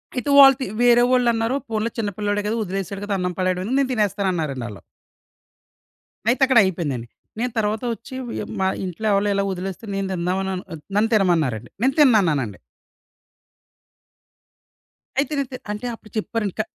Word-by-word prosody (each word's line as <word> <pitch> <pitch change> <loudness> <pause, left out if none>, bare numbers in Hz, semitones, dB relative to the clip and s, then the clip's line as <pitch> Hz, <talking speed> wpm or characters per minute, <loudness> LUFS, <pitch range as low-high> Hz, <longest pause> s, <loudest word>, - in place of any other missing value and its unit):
అయితే 250 +3 -2
వాళ్ళు 270 -1 +9
తి - - 0 0.2
వేరే 240 0 +6
వాళ్ళన్నారు 235 -1 +2
పోనీలే 220 +1 -1
చిన్న 210 -2 0
పిల్లోడే 205 0 0
గదా! 220 - 0
ఒదిలేసాడు 195 0 -4
గదా! 205 - -2
అన్నం 180 0 -1
పడేయడం 185 -1 0
ఎందుకు 255 +6 0
నేను 275 -2 +1
తినేస్తానన్నారండి 185 - -1
ఆళ్ళు. 105 -3 -10 1.5
అయితే 240 +2 +1
అక్కడ 260 -3 +5
అయిపోయిందండి. 145 -10 -2 0.3
నేను 245 +1 -1
తరువాత 215 +2 0
ఒచ్చి 260 +4 -11
వ్ - - -6
య - - -3 0.2
మా 190 - +3 0.2
ఇంట్లో 185 +5 -4
ఎవలో 200 +1 +2
ఇలా 200 - +1
ఒదిలేస్తే 190 +3 -5
నేను 195 -1 -1
తిందాం 180 +1 -1
అను 190 0 -2 0.4
నన్ను 220 +2 +3
తినమన్నారండి. 160 - +1
నేను 265 +3 +3
తిన్నన్నానండి. 165 - +3 2.6
అయితే 290 - 0
నేను 275 -2 -1
తిన్ 255 - -8
అంటే 210 +4 -5
అప్పుడు 215 -2 -19
చెప్పారండి. 215 -2 -2
క - - +5
205 Hz, 160 wpm, -22 LUFS, 180-235 Hz, 2.6 s, వాళ్ళు